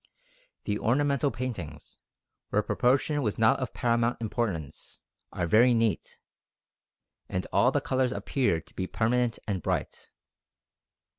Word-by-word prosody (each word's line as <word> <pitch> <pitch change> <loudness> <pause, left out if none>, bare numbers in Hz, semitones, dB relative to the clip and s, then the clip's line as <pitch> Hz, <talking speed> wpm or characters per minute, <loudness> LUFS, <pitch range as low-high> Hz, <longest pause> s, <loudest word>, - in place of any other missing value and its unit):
The 105 0 -2
ornamental 140 +3 +2
paintings, 120 - -6 0.5
where - - +1
proportion 140 +4 +1
was 105 -6 -1
not 110 0 +4
of 130 -3 -3
paramount 120 0 0
importance, 105 - -4 0.3
are 90 - -2
very 120 +8 +5
neat, 115 -3 -1 1.1
and 90 - -2
all 125 - +4
the 145 - 0
colours 130 -3 0
appear 125 -11 0
to - - -18
be 95 - -3
permanent 120 +2 0
and 95 -4 -2
bright." - - -3
120 Hz, 125 wpm, -28 LUFS, 105-130 Hz, 1.1 s, very